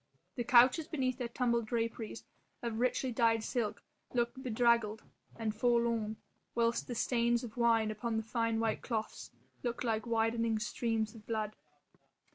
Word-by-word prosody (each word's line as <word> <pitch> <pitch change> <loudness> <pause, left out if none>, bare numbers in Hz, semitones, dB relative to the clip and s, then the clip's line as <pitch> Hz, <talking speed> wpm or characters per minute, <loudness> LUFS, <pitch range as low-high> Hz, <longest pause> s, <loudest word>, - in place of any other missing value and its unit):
The 240 - -2
couches 255 +6 +5
beneath 255 -6 -1
their 245 - -1
tumbled 235 -1 0
draperies 230 -1 -3 0.4
of 230 -2 -2
richly 255 +1 +1
dyed 225 -2 +2
silk 225 -3 -2 0.3
looked 240 +2 0
bedraggled 230 -3 +2 0.3
and 220 -2 -2
forlorn, 230 -1 +1 0.4
whilst 235 0 +1
the 245 - -4
stains 235 0 +1
of 225 -3 -7
wine 230 -2 +3
upon 225 +1 -2
the 220 - -1
fine 230 0 0
white 225 -1 0
cloths 220 -3 -4 0.3
looked 240 0 -2
like 225 -1 -1
widening 225 0 +1
streams 220 0 -1
of 220 -2 -14
blood. 215 -2 -2
230 Hz, 145 wpm, -33 LUFS, 220-240 Hz, 0.4 s, couches